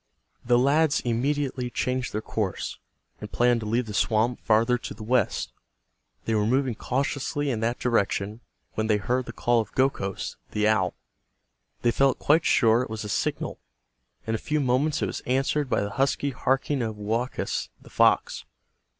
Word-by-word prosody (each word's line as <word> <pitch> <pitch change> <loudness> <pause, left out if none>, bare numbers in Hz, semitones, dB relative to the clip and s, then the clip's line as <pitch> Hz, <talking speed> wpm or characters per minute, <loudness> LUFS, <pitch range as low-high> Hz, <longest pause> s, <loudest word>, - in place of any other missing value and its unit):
The 120 0 +3
lads 140 +4 +3
immediately 130 +1 -1
changed 125 0 -2
their 110 +1 -3
course, 105 -4 -3 0.4
and - - -8
planned 120 0 +3
to 105 - -5
leave 115 +3 +1
the 105 - -7
swamp 115 +3 +1
farther 115 +3 +3
to - - -7
the 110 - -9
west. 120 -1 0 0.7
They 115 - 0
were 105 -1 +2
moving 130 +1 +1
cautiously 140 +4 -1
in 115 - -2
that 115 +2 0
direction 105 -2 0 0.3
when 110 0 -1
they 105 -1 +3
heard 125 +6 -1
the - - -5
call 120 0 +2
of 105 - -8
Gokhos, 130 -8 -1 0.2
the 105 0 +2
owl. 100 -5 +2 0.9
They 120 - +4
felt 135 +2 +2
quite 160 +3 +3
sure 115 0 +4
it 125 - -4
was 110 0 -5
a 105 - -6
signal. - - -2 0.7
In 110 - -2
a 110 - -1
few 150 0 -1
moments 140 +3 +1
it - - +3
was - - -4
answered 135 +2 +1
by - - +1
the 100 0 -3
husky 140 +4 0
harking 135 +2 0
of 110 -2 -2
Woakus, 115 +5 -2
the - - -17
fox. - - +2
120 Hz, 175 wpm, -26 LUFS, 110-135 Hz, 0.9 s, They